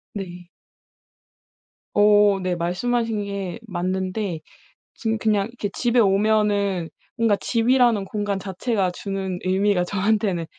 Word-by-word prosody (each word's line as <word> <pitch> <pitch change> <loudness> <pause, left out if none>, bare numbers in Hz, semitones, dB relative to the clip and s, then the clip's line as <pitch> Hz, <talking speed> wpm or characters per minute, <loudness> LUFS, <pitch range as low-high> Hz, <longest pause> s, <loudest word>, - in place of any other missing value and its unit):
네. 180 -3 -7 1.5
어 205 -1 +5
네. 180 -1 -1
말씀하신 215 +5 -1
게 200 0 -5
맞는데 185 0 -2 0.6
지금 225 -1 -1
그냥 210 -2 +1
이렇게 235 -3 -5
집에 240 0 +1
오면은 200 -3 +2 0.3
뭔가 225 -3 +3
집이라는 235 -2 +2
공간 205 -1 -2
자체가 195 0 -1
주는 190 -1 -4
의미가 190 0 +2
저한테는 195 -2 0
200 Hz, 245 characters per minute, -23 LUFS, 185-220 Hz, 1.5 s, 어